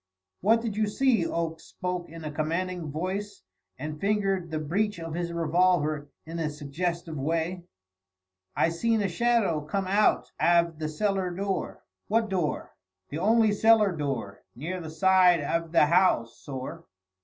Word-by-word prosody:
"What 225 +4 +3
did 220 -4 -3
you 215 -1 +2
see?" 230 -4 +2
Oakes 165 -1 -3
spoke 180 -2 -4
in 165 0 -10
a 150 - -4
commanding 165 +2 -2
voice 190 +6 -4 0.3
and 150 +3 -6
fingered 195 -3 0
the 160 - -2
breech 195 +7 -1
of 165 -1 -6
his 170 0 -2
revolver 165 -3 +1 0.2
in 165 +1 -6
a 160 -2 0
suggestive 160 +3 -4
way. 165 +5 -2 0.9
"I - - +3
seen 220 +6 +1
a - - +1
shadow 200 -4 +1
come 190 +6 -2
out 200 +3 +2
av 170 -2 +3
the 155 -1 -2
cellar 195 +2 0
door." 195 +2 -3 0.2
"What 220 +1 +1
door?" 180 -6 -2 0.3
"The 150 - -4
only 220 +3 +4
cellar 215 -1 +5
door; 135 -9 -4
near 170 +8 -4
the 160 - -7
side 180 +1 +4
av 165 +2 -1
the 165 - +5
house, 150 -8 +3
sorr." 130 -2 -7
175 Hz, 155 wpm, -27 LUFS, 155-195 Hz, 0.9 s, cellar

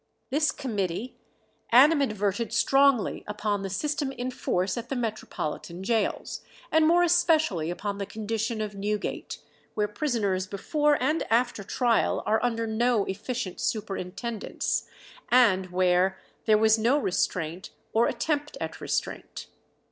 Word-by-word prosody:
This 300 +2 +2
committee 210 -2 -3 0.5
animadverted 235 -6 +4
strongly 270 +1 +3
upon 210 -1 -2
the 195 - -4
system 290 - -1
in 255 -1 -4
force 185 -6 -1
at 235 - -6
the 275 - -2
metropolitan 200 -6 -4
gaols, 220 0 -1 0.3
and 315 0 +4
more 345 +2 +5
especially 315 - +2
upon 200 +3 -4
the 200 - -3
condition 220 +1 -3
of 210 -1 -3
Newgate, 205 +1 -3 0.4
where 210 -1 +1
"prisoners 205 -6 -1
before 295 - +1
and 315 +2 +1
after 235 -2 +1
trial 235 +3 +1
are 220 +2 +1
under 230 -2 0
no 225 -1 +1
efficient 205 0 -4
superintendence," 210 +1 -3 0.4
and 200 -7 +4
where 180 +1 +2 0.3
"there 215 -1 +5
was 220 +1 +4
no 240 +6 +3
restraint, 180 - -1 0.2
or 230 +2 +4
attempt 295 -1 -2
at - - -5
restraint." - - -4
220 Hz, 125 wpm, -27 LUFS, 195-255 Hz, 0.5 s, more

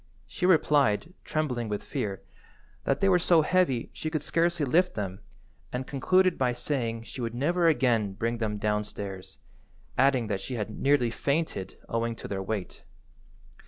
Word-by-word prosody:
She 180 - -1
replied, 150 - +3
trembling 125 -7 -2
with 105 -1 -3
fear, 100 -3 -4 0.6
that 135 0 +1
they 195 - +4
were 180 -2 +5
so 170 -2 +4
heavy 155 -9 +1
she 155 - -4
could 155 -2 -2
scarcely 170 -1 +1
lift 180 +7 +2
them, 95 -3 -4 0.5
and 125 +1 -3
concluded 185 +7 +2
by 125 -2 +2
saying 120 -3 -2
she 120 +3 -8
would 115 0 -3
never 170 +7 +2
again 120 -10 +2
bring 115 +3 -2
them 105 -2 -1
downstairs, 105 -2 -3 0.6
adding 130 -3 +4
that 100 -2 -2
she 130 - -5
had 110 -2 -3
nearly 130 0 +2
fainted 140 - -2
owing 115 0 -1
to - - -8
their 95 -1 -3
weight. 95 -1 -4
125 Hz, 160 wpm, -28 LUFS, 110-155 Hz, 0.6 s, were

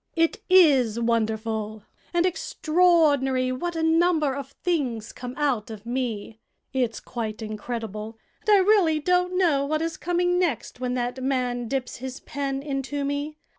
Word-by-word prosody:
It 330 +6 +1
is 275 - +5
wonderful 220 -2 -1 0.3
and 345 0 +2
extraordinary 310 -7 +2
what 340 +7 -3
a 325 - -1
number 320 -3 +3
of 280 0 -7
things 255 -11 -1
come 250 0 -7
out 270 -8 0
of 215 -1 -9
me. 235 -3 -3 0.3
It's 245 -4 0
quite 220 -2 -5
incredible, 215 0 -5 0.2
and - - -5
I 410 -1 +7
really 370 -6 +4
don't 360 +3 +1
know 320 -7 +3
what 310 +3 -1
is 330 -1 -3
coming 355 0 +1
next 305 - -1
when 250 0 -2
that 245 +1 -2
man 250 -2 -1
dips 255 0 -3
his 260 +2 -6
pen 275 -1 -4
into 280 0 -3
me. 285 +2 -3
270 Hz, 150 wpm, -25 LUFS, 235-325 Hz, 0.3 s, I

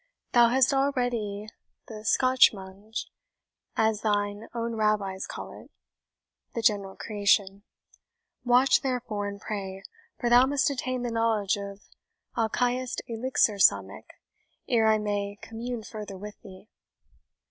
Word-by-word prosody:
Thou 240 -1 +6
hast 260 +2 +3
already 245 -7 -1 0.4
the 215 -2 -9
SCHAHMAJM, 215 -5 +2 0.7
as 220 -1 +1
thine 205 0 -1
own 230 0 -3
Rabbis 210 -3 0
call - - -7
it - - -13 0.9
the 230 - -2
general 200 -3 +1
creation; 200 -2 +1 0.8
watch, 250 +2 +4
therefore, 235 -6 -2
and 200 0 -6
pray, 195 -2 -5 0.4
for 240 - -1
thou 245 +2 +6
must 285 +2 +1
attain 255 -2 -3
the 240 - -2
knowledge 225 -3 +1
of 200 0 -7 0.5
Alchahest 245 +2 0
Elixir 230 -3 +1
Samech 100 - +3 0.6
ere 225 -2 +3
I 220 0 +5
may 205 -1 -2
commune 230 +1 -6
further 210 -3 -8
with 210 +2 -10
thee." 190 +1 -13
215 Hz, 120 wpm, -27 LUFS, 200-245 Hz, 0.9 s, Thou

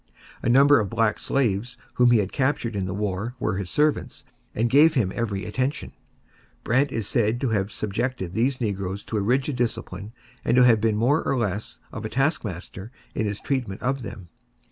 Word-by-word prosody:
A - - 0
number 140 +3 +6
of 105 -3 -1
black 115 +1 +1
slaves 120 -2 0 0.2
whom 125 0 +4
he 120 - +5
had 100 -2 0
captured 130 -5 0
in 95 -2 -1
the 90 - -3
war 105 +3 -3
were 95 - -1
his 95 -3 -4
servants 150 - 0 0.3
and 115 +2 +2
gave 150 +6 +5
him 105 -8 +1
every 100 -5 -2
attention. 130 - -2 0.7
Brant 130 +4 +2
is 115 -5 -2
said 115 -1 +1
to 135 - +1
have 105 -2 0
subjected 105 -2 -3
these 125 +5 +1
negroes 100 -3 -3
to 110 - -3
a - - +1
rigid 130 +5 0
discipline 110 -3 -3 0.3
and - - +2
to 125 - +7
have 115 -3 +5
been 110 -1 +2
more 130 +9 +2
or 135 - 0
less 105 -3 -2
of - - -6
a 110 - -3
taskmaster 110 - -2 0.2
in 110 - -1
his 105 0 -3
treatment 125 -8 -3
of 135 +1 0
them. 95 -6 -8
115 Hz, 190 wpm, -24 LUFS, 100-130 Hz, 0.7 s, to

